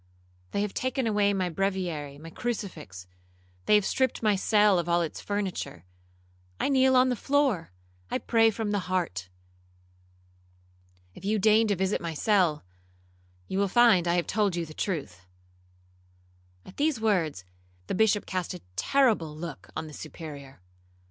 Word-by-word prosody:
They 200 Hz, -, -1 dB
have 210 Hz, -, -4 dB
taken 255 Hz, 0 st, -1 dB
away 205 Hz, -2 st, +2 dB
my 190 Hz, -2 st, 0 dB
breviary, 175 Hz, -6 st, -2 dB
my 165 Hz, +3 st, -11 dB
crucifix;—they 90 Hz, -, -4 dB
have 210 Hz, -2 st, +3 dB
stript 260 Hz, -3 st, 0 dB
my 210 Hz, -2 st, +4 dB
cell 205 Hz, -1 st, +4 dB
of 170 Hz, 0 st, -3 dB
all 170 Hz, 0 st, +3 dB
its 160 Hz, -, -5 dB
furniture. 195 Hz, -, -4 dB, 0.7 s
I -, -, +1 dB
kneel 265 Hz, -1 st, +4 dB
on 255 Hz, 0 st, +5 dB
the 250 Hz, -, +1 dB
floor—I 160 Hz, -, -2 dB
pray 225 Hz, -1 st, +3 dB
from 220 Hz, -1 st, -3 dB
the 200 Hz, -3 st, -2 dB
heart. 95 Hz, -, -2 dB, 1.8 s
If -, -, -14 dB
you 210 Hz, +2 st, +1 dB
deign 215 Hz, +2 st, +4 dB
to 205 Hz, -, +1 dB
visit 190 Hz, +2 st, 0 dB
my 165 Hz, -1 st, -4 dB
cell, 175 Hz, -, +2 dB, 0.8 s
you 190 Hz, -, -2 dB
will 200 Hz, -, +2 dB
find 205 Hz, -4 st, +5 dB
I 170 Hz, -, +2 dB
have 175 Hz, -, +1 dB
told 205 Hz, -4 st, 0 dB
you 170 Hz, -1 st, -2 dB
the 155 Hz, -, -11 dB
truth.' 140 Hz, -, -4 dB, 1.4 s
At 185 Hz, -, -14 dB
these 295 Hz, -4 st, +1 dB
words, 170 Hz, -, 0 dB, 0.4 s
the -, -, -3 dB
Bishop 210 Hz, +1 st, +2 dB
cast 185 Hz, -1 st, -3 dB
a 180 Hz, -, -10 dB
terrible 210 Hz, -, +2 dB
look 165 Hz, -2 st, -8 dB
on 155 Hz, -, -3 dB
the 155 Hz, -, -10 dB
Superior. 145 Hz, -, -9 dB
185 Hz, 150 wpm, -27 LUFS, 155-215 Hz, 1.8 s, on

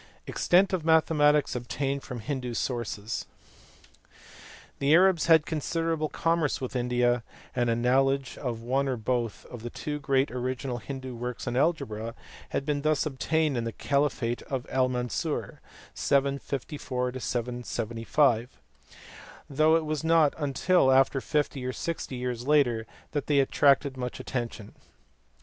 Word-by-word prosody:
Extent 190 Hz, +2 st, +3 dB
of 180 Hz, -4 st, 0 dB
mathematics 150 Hz, -3 st, +3 dB
obtained 135 Hz, +3 st, -2 dB
from 125 Hz, -3 st, -7 dB
Hindoo 125 Hz, 0 st, -3 dB
sources. 115 Hz, -3 st, -3 dB, 1.5 s
The 140 Hz, +3 st, +4 dB
Arabs 185 Hz, -2 st, +4 dB
had 160 Hz, -2 st, +6 dB
considerable 160 Hz, 0 st, -1 dB
commerce 165 Hz, -3 st, 0 dB
with 130 Hz, +1 st, -5 dB
India, 120 Hz, 0 st, +1 dB, 0.3 s
and 120 Hz, -1 st, +1 dB
a 115 Hz, -, +2 dB
knowledge 135 Hz, +3 st, +2 dB
of 120 Hz, -4 st, -4 dB
one 135 Hz, +3 st, +1 dB
or 130 Hz, -2 st, -1 dB
both 115 Hz, -1 st, -2 dB
of 120 Hz, -3 st, -9 dB
the 120 Hz, -, -5 dB
two 150 Hz, +4 st, -4 dB
great 135 Hz, -1 st, +1 dB
original 125 Hz, 0 st, -3 dB
Hindoo 130 Hz, +2 st, -6 dB
works 125 Hz, +1 st, -5 dB
on 120 Hz, -, -1 dB
algebra 115 Hz, -7 st, 0 dB, 0.3 s
had 140 Hz, -, -2 dB
been 145 Hz, -1 st, 0 dB
thus 155 Hz, +1 st, +1 dB
obtained 155 Hz, 0 st, 0 dB
in 120 Hz, -, -1 dB
the 115 Hz, -, -3 dB
caliphate 140 Hz, -3 st, 0 dB
of 130 Hz, -3 st, -2 dB
Al 130 Hz, -1 st, +2 dB
Mansur 125 Hz, -2 st, -3 dB, 0.3 s
(754 135 Hz, -2 st, -1 dB
775), 120 Hz, +1 st, 0 dB, 0.9 s
though 155 Hz, +3 st, +3 dB
it 165 Hz, -1 st, +1 dB
was 155 Hz, 0 st, -2 dB
not 160 Hz, -3 st, +4 dB
until 145 Hz, +2 st, +2 dB, 0.3 s
fifty 145 Hz, -3 st, -1 dB
or 130 Hz, 0 st, -2 dB
sixty 165 Hz, -4 st, -4 dB
years 125 Hz, 0 st, -4 dB
later 125 Hz, -7 st, +3 dB, 0.2 s
that 145 Hz, -2 st, -2 dB
they 145 Hz, -, +2 dB
attracted 140 Hz, 0 st, +3 dB
much 125 Hz, -1 st, -4 dB
attention. 115 Hz, -5 st, -5 dB
135 Hz, 135 wpm, -28 LUFS, 120-150 Hz, 1.5 s, had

